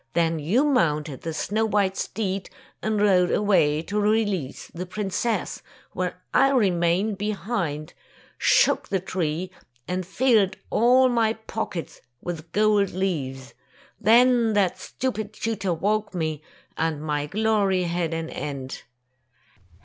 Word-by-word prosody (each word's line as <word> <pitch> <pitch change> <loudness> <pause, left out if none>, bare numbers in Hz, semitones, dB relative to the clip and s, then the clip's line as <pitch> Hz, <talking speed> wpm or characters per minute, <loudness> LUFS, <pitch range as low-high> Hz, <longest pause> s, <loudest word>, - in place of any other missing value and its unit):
Then 165 -1 +1
you 190 - +2
mounted 155 - +1
the 165 - -4
snow 210 +7 -1
white 200 -2 +1
steed 195 -3 -3 0.3
and 220 -1 0
rode 185 -3 +4
away 160 -7 +2
to 205 +4 -2
release 205 -8 0
the 180 +2 -5
princess, 210 +4 -2 0.3
while - - -2 0.2
I 270 - +5
remained 195 -4 +2
be 210 +1 -1
hind, 185 -8 -3 0.5
shook - - +3
the 195 - +1
tree, 180 -1 -3 0.4
and 185 +1 -2
filled 205 0 +2
all 250 +3 +5
my 230 -3 +2
pockets 190 -7 -5 0.2
with 165 0 -6
gold 210 -2 +3
leaves. 140 -8 -3 0.5
Then 235 0 +5
that 200 -3 +1
stupid 220 -5 -4
tutor 220 -4 -2
woke 205 +2 -1
me, 155 -3 -2 0.3
and 160 -2 -1
my 150 -1 -2
glory 205 -1 +1
had 170 -1 -1
an 165 0 -3
end." 135 -2 -5
190 Hz, 125 wpm, -24 LUFS, 165-215 Hz, 0.5 s, I